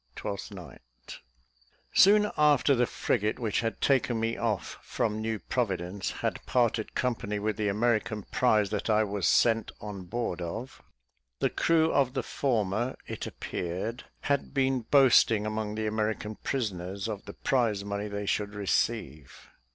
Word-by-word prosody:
Twelfth 100 +1 -5
Night. 65 - -12 0.7
Soon 210 +1 +6
after 150 -2 +4
the 125 -2 +2
frigate 110 -2 0
which 115 -5 -1
had 115 -1 -3
taken 130 -4 +2
me 115 +1 0
off 110 -5 -2
from 110 -1 -2
New 110 0 -1
Providence 95 -5 -2
had - - -3
parted 120 -3 +1
company 115 -5 -1
with 105 +1 -1
the 105 0 -1
American 110 0 0
prize 105 -5 +3
that 105 +1 -2
I 110 0 +4
was 100 -5 -1
sent 115 - +3
on 100 -3 -7
board 90 -2 -3
of, 110 +10 -6 0.6
the - - 0
crew 160 -1 +2
of 135 -1 +2
the 130 - 0
former, 120 -2 -1
it - - -5
appeared, 95 +8 -4 0.2
had 140 0 -1
been 135 -1 +2
boasting 120 -6 +5
among 110 -1 -3
the 110 0 -2
American 110 0 -2
prisoners 100 -6 -3
of 105 -3 -5
the - - -8
prize 115 -6 0
money 100 +1 -3
they 100 0 -4
should 105 +1 -1
receive. 95 - -2
110 Hz, 150 wpm, -29 LUFS, 100-120 Hz, 0.7 s, Soon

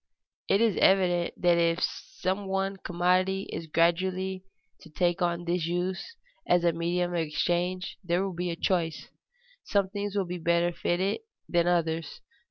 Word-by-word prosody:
_ - - -63 0.5
It 200 - +3
is 225 -4 +3
evident 180 -3 +3
that 175 -1 +4
if 170 0 +2
some 190 +2 -3
one 195 0 -1
commodity 185 +2 +1
is 165 0 -5
gradually 185 +3 +1 0.4
to 160 - -15
take 175 +3 0
on 175 0 0
this 170 -1 0
use 185 - -3 0.3
as 175 -1 +3
a 170 -1 +3
medium 175 +2 -1
of 175 - 0
exchange 175 +4 -1
there 175 +1 +1
will 195 -1 -3
be 175 +1 -2
a 170 - -2
choice; 165 -3 -1 0.5
some 200 -2 +1
things 205 0 -3
will 200 -2 +1
be 180 0 -5
better 170 +1 +2
fitted 185 +4 0 0.3
than 175 0 +2
others. 165 -2 0
175 Hz, 165 wpm, -28 LUFS, 170-190 Hz, 0.5 s, that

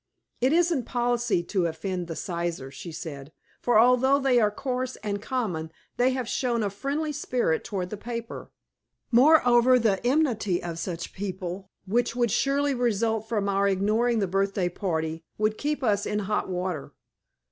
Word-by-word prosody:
"It 255 +2 +2
isn't 335 -6 +2
policy 240 -6 0
to 180 -1 0
offend 175 +2 -4
the 165 - -5
Sizers," 170 -7 -3
she 155 +5 -8
said, 150 -3 -7 0.3
"for 240 -2 +3
although 250 +4 +5
they 265 -3 +3
are 210 -2 +4
coarse 255 +2 -3
and 205 -1 -2
common 190 -11 -2 0.3
they 245 +1 +4
have 255 -2 -2
shown 235 -3 0
a 200 - -1
friendly 285 +9 -2
spirit 250 - 0
toward 185 -5 -4
the 210 - -4
paper. 230 +1 -6 0.6
Moreover, 250 -2 +6
the 215 -5 +1
enmity 240 - +1
of 170 -1 -5
such 170 -1 -5
people 190 -1 -5 0.2
which 235 +4 0
would 240 -3 +1
surely 280 +3 +1
result 225 -2 0
from 210 -4 0
our 200 0 +2
ignoring 215 +5 +2
the 205 - +2
birthday 195 0 0
party 160 -3 -3
would 215 0 0
keep 295 -1 -2
us 205 -4 +1
in 210 - -1
hot 210 0 -1
water." 180 -4 -3
215 Hz, 160 wpm, -26 LUFS, 185-245 Hz, 0.6 s, Moreover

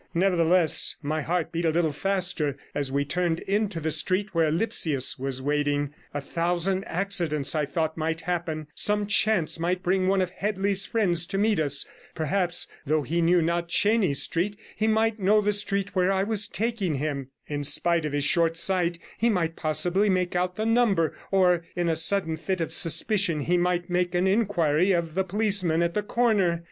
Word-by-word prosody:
Nevertheless, 175 -2 +2
my 155 +2 -2
heart 170 +2 -2
beat 170 0 -3
a 165 - +2
little 160 -1 +1
faster 175 -4 -1 0.2
as 140 -2 -2
we 140 +1 0
turned 170 +2 -1
into 200 -3 -1
the 160 0 -2
street 185 +7 0
where 165 -2 +2
Lipsius 155 - +2
was 130 0 -2
waiting. 145 0 -1 0.2
A 145 - -3
thousand 175 +5 -1
accidents, 170 -7 -1
I 155 -2 0
thought, 160 +2 -2
might 160 +1 -2
happen; 165 -3 -3
some 210 0 +1
chance 205 -5 +1
might 180 +2 -1
bring 185 +1 +1
one 195 0 +2
of 185 -1 -1
Headley's 195 0 0
friends 175 -7 +1
to 195 - -3
meet 210 -1 +2
us; 145 -2 +1 0.3
perhaps, 175 +3 -1 0.2
though 155 0 0
he 170 +6 -1
knew 170 0 +3
not 170 +1 -1
Chenies 205 -6 +2
Street, 200 +5 -1 0.2
he 215 - 0
might 220 0 +1
know 205 +2 +3
the 210 0 +1
street 200 -1 0
where 185 +1 +2
I 190 0 +1
was 210 -1 +1
taking 205 -4 -2
him; 140 -2 -3 0.2
in 145 -1 -4
spite 170 +4 +1
of 150 - -3
his 145 -1 0
short 165 +2 +2
sight, 175 -1 +1 0.2
he 235 - +2
might 170 -6 -1
possibly 175 +6 +1
make 180 -2 0
out 180 0 -1
the 215 - -2
number; 225 -8 +2
or, 180 -3 +3
in 175 -1 -1
a 165 - +1
sudden 165 0 +1
fit 190 +1 -3
of 165 - -2
suspicion, 170 0 +1
he 175 +5 0
might 175 0 0
make 180 -1 -1
an 175 +1 +2
inquiry 190 -4 +2
of 170 -2 -1
the 190 +3 0
policeman 190 -4 0
at 170 0 -1
the 210 - 0
corner. 205 -6 +1
175 Hz, 185 wpm, -25 LUFS, 160-195 Hz, 0.3 s, knew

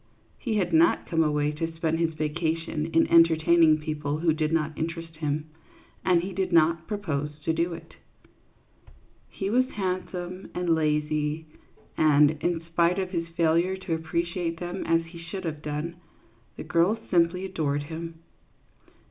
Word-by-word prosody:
He 230 -4 -2
had 210 - 0
not 330 +1 +4
come 165 -2 +1
away 150 -1 +1
to 165 +2 -3
spend 165 0 -1
his 165 -1 0
vacation 155 0 -2
in 165 0 +3
entertaining 165 -1 +5
people 150 -1 -3
who 160 0 +2
did 155 0 -1
not 155 -1 0
interest 165 0 -5
him, 150 -1 -2 0.6
and 175 -2 +3
he 190 +1 -5
did 190 0 -1
not 165 0 +3
propose 155 -9 -2 0.2
to 160 - +2
do 170 +1 0
it. - - -13 1.3
He 195 +1 -3
was 255 +2 +3
handsome 185 -1 -4
and 175 -2 +1
lazy, 150 0 0 0.5
and, 150 -1 +5
in 175 -2 0
spite 170 +2 +1
of 190 -1 -2
his 170 -2 -2
failure 170 +3 +2
to 190 -3 -4
appreciate 170 +1 -2
them 175 +2 -4
as 165 0 +2
he 170 +1 -11
should 170 +3 -6
have 155 -2 -4
done, 150 +3 -4 0.6
the - - -5
girls 175 +6 +2
simply 180 +1 +2
adored 145 -6 -1
him. 165 +1 -7
165 Hz, 155 wpm, -26 LUFS, 155-175 Hz, 1.3 s, entertaining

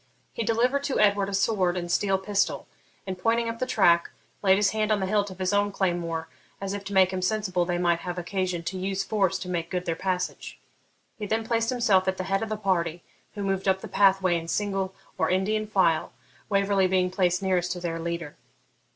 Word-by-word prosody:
He - - -4
delivered 245 +5 +1
to 275 - -1
Edward 200 -1 +3
a - - -5
sword 190 -3 +1
and 175 -1 -3
steel 195 0 +2
pistol, 195 +1 -1 0.4
and, 190 -1 -5
pointing 230 +4 +1
up 230 0 -4
the 255 - -1
track, 170 -8 +3 0.3
laid 190 -2 +5
his 200 -1 +2
hand 215 0 0
on 210 - +2
the 190 - -1
hilt 205 +1 +1
of 185 - -10
his 185 +1 -1
own 205 0 +2
claymore, 170 -4 -1 0.3
as 195 0 -4
if 200 -1 -5
to 200 - -6
make 190 -1 +4
him 185 - -2
sensible 185 -2 0
they 175 0 -1
might 175 -1 +2
have 175 +1 -5
occasion 180 -1 -2
to 185 +2 -4
use 195 +1 -1
force 195 -2 +1
to 185 - -7
make 170 -2 -3
good 180 0 -3
their 165 - -1
passage. 180 0 -3 0.6
He 210 - -4
then 220 +2 -1
placed 230 0 0
himself 210 -7 +2
at 190 0 0
the 185 - -2
head 195 +1 0
of 225 - -3
the 215 - -2
party, 175 -4 -1 0.3
who 205 - -4
moved 195 0 -1
up 190 0 +2
the - - -7
pathway 190 -3 +3
in 165 - -9
single 195 0 -1 0.2
or - - +2
Indian 215 +4 0
file, 185 -6 +1 0.4
Waverley 200 -1 +2
being 185 -1 +1
placed 180 0 +1
nearest 180 -2 +1
to 180 - -7
their 165 -1 -3
leader. 170 -2 -4
190 Hz, 220 wpm, -26 LUFS, 180-205 Hz, 0.6 s, laid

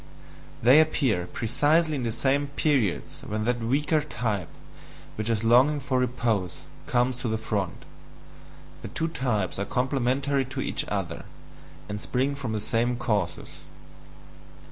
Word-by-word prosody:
They 130 +6 +8
appear 130 - +1
precisely 150 - +2
in 140 - -1
the 115 -2 -1
same 140 +5 +1
periods 135 - 0
when 110 +1 -3
that 120 0 +1
weaker 145 +7 +1
type, 110 - -2 0.7
with 110 +1 -3
its 115 -1 0
longing 130 +6 +5
for 130 -1 0
repose, 115 -7 -1 0.3
comes 125 +1 +2
to 125 - -3
the 110 0 0
front; 105 -4 -3 1.0
the - - -6
two 165 - -2
types 110 - -1
are 100 - -1
complementary 135 +3 0
to 130 - -6
each - - -1
other, - - -3 0.6
and 105 0 -5
spring 130 +4 0
from 130 -5 -4
the 110 - -1
same 120 +3 0
causes. 100 -8 -2
125 Hz, 140 wpm, -26 LUFS, 110-140 Hz, 1.0 s, They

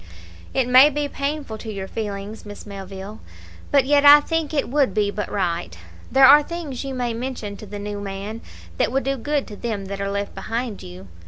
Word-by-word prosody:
"It 260 -2 +1
may 255 +4 +8
be 295 0 -2
painful 280 -5 -4
to 220 - -6
your 195 -2 -5
feelings, 205 0 -5
Miss 205 -1 -10
Melville, 195 +1 -8 0.5
but 280 -2 +4
yet 285 +1 +4
I 290 +1 +10
think 325 0 -2
it 290 -3 0
would 275 -1 +1
be 205 -1 +1
but 210 - -4
right. 170 - -2 0.3
There 265 0 +7
are 290 +3 +9
things 295 -5 -5
you 270 -1 -5
may 245 -2 -1
mention 230 -4 -5
to 215 - -10
the 205 +1 -7
new 205 0 -5
man 200 +3 -6 0.4
that - - +2
would 270 +1 0
do 275 +1 0
good 285 +3 -1
to 210 - -8
them 210 -3 -4
that 200 +1 -5
are 200 - -1
left 200 0 -3
behind 230 -2 -4
you. 90 +2 -11
225 Hz, 205 wpm, -22 LUFS, 200-275 Hz, 0.5 s, I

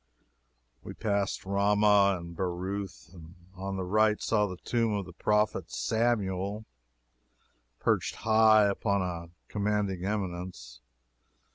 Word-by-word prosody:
We - - -9
passed 100 -3 -1
Ramah, 100 0 +3
and 85 0 -9
Beroth, 95 +1 -4
and 85 -1 -13 0.2
on 95 +1 -5
the 95 - -2
right 105 +3 +2
saw 105 -2 +1
the 90 -2 -7
tomb 115 0 0
of 100 -2 -3
the 90 - -11
prophet 105 +4 0
Samuel, 105 -3 -1 1.1
perched - - 0
high 110 -1 +5
upon 100 -1 0
a 85 -2 -5 0.2
commanding 105 -3 -1
eminence. 90 - -4
100 Hz, 115 wpm, -29 LUFS, 90-105 Hz, 1.1 s, high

